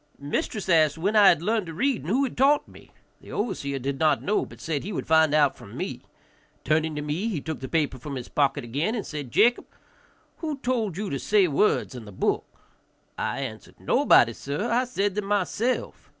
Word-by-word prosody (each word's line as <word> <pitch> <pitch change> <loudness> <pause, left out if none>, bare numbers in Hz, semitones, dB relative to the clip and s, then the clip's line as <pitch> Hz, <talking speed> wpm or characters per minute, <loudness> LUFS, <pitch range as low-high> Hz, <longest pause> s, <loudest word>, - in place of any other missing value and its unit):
Mistress 145 +8 -3
asked 160 -4 +4
when 200 +6 0
I 205 -2 +7
had 170 -3 +5
learned 215 -1 0
to 165 - -7
read 265 - 0
and 150 - -7
who 255 +7 +2
had 265 - -3
taught 280 +3 +3
me. - - -16 0.3
The - - -13
overseer 140 - -2
did 135 +1 -3
not 155 -1 +2
know, 210 +2 0
but - - -14
said 155 -4 -3
he 205 - -5
would 185 - -4
find 160 -1 +4
out 145 -2 +3
from - - -12
me. - - -4 0.6
Turning 155 +1 +1
to 150 - -3
me 155 +9 -2
he 200 -9 -2
took 160 +2 -5
the 130 - -6
paper 150 -5 0
from 140 +2 -6
his 125 -2 -6
pocket 140 -1 0
again, 145 - -1
and 220 - -3
said, 145 -4 -6
"Jacob, 240 - +3 0.7
who 310 -4 -4
told 235 - -1
you 205 0 -3
to 140 - -2
say 200 +2 +3
words 160 +1 +1
in 120 -3 -8
the 105 - -10
book?" 95 - -1 0.7
I 140 - -2
answered, 110 -5 -7
"Nobody, - - +4
sir; 150 +13 -3
I 245 +2 +2
said 205 -5 -1
them 210 0 -3
myself." 205 +5 -1
165 Hz, 210 wpm, -25 LUFS, 145-215 Hz, 0.7 s, I